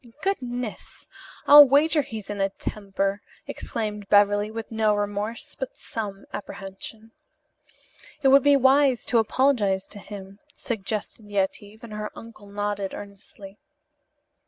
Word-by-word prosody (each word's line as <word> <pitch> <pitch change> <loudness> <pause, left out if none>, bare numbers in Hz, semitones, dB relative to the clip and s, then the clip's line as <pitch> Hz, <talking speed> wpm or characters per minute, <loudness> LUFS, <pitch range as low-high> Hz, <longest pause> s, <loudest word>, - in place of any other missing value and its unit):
"Goodness, 250 - -4 0.4
I'll 290 +1 +11
wager 295 +3 +4
he's 220 -6 -7
in 205 -1 -3
a 195 - +2
temper!" 195 0 -3 0.2
exclaimed 210 -3 -5
Beverly, 205 0 +4
with 225 +1 -7
no 220 -1 +2
remorse, 205 +7 -3
but 265 - -6
some 200 -3 -6
apprehension. 205 +3 -8 1.1
"It 270 - +6
would 275 +1 +7
be 285 +1 +5
wisdom 265 -1 +3
to 240 - +4
apologize 220 -5 +1
to 205 - -7
him," 200 -1 -10 0.2
suggested 215 -1 -4
Yetive, 205 +2 -2
and 225 -2 -9
her 210 0 -4
uncle 225 -3 -12
nodded 205 -1 -3
earnestly. 200 0 -11
210 Hz, 125 wpm, -25 LUFS, 200-245 Hz, 1.1 s, I'll